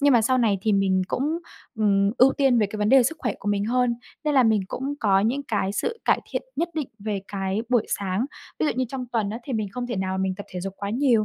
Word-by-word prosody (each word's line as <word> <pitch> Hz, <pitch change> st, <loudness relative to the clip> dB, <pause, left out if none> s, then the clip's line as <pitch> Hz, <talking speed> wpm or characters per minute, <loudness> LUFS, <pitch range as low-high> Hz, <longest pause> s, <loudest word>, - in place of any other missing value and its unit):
Nhưng 285 Hz, 0 st, +5 dB
mà 235 Hz, -3 st, +5 dB
sau 255 Hz, +3 st, +3 dB
này 215 Hz, -5 st, +2 dB
thì 215 Hz, -, +2 dB
mình 190 Hz, -1 st, +2 dB
cũng, 300 Hz, +6 st, -1 dB, 0.4 s
ừm, 200 Hz, -3 st, +3 dB
ưu 265 Hz, +2 st, +7 dB
tiên 270 Hz, -4 st, +3 dB
về 210 Hz, -, +3 dB
cái 205 Hz, -, -7 dB
vấn 210 Hz, -, +1 dB
đề 265 Hz, +2 st, +7 dB
sức 320 Hz, +7 st, -1 dB
khỏe 240 Hz, -, -1 dB
của 205 Hz, -, -4 dB
mình 205 Hz, 0 st, +1 dB
hơn 245 Hz, +1 st, +2 dB, 0.3 s
nên 300 Hz, -1 st, +1 dB
là 260 Hz, -, +6 dB
mình 220 Hz, -3 st, +3 dB
cũng 275 Hz, +5 st, -3 dB
có 195 Hz, -3 st, +4 dB
những 240 Hz, +7 st, 0 dB
cái 205 Hz, -7 st, -1 dB
sự 460 Hz, -, -2 dB
cải -, -, +3 dB
thiện -, -, -2 dB
nhất 340 Hz, +2 st, 0 dB
định 305 Hz, -5 st, -2 dB
về 205 Hz, -1 st, -3 dB
cái 195 Hz, +1 st, -2 dB
buổi 245 Hz, -3 st, +2 dB
sáng. 195 Hz, +2 st, -1 dB, 0.3 s
Ví -, -, +1 dB
dụ -, -, +2 dB
như 255 Hz, -, +1 dB
trong 255 Hz, -1 st, -5 dB
tuần 215 Hz, -4 st, 0 dB
á, 220 Hz, -, -4 dB
thì 275 Hz, -, -5 dB
mình 215 Hz, -3 st, -1 dB
không 250 Hz, +2 st, -3 dB
thể 240 Hz, -3 st, -3 dB
nào 190 Hz, 0 st, -1 dB
mình 190 Hz, 0 st, 0 dB
tập 200 Hz, -, -9 dB
thể 180 Hz, -, -6 dB
dục 195 Hz, +1 st, -5 dB
quá 200 Hz, 0 st, -4 dB
nhiều, 240 Hz, -2 st, +3 dB
220 Hz, 280 wpm, -24 LUFS, 200-255 Hz, 0.4 s, ưu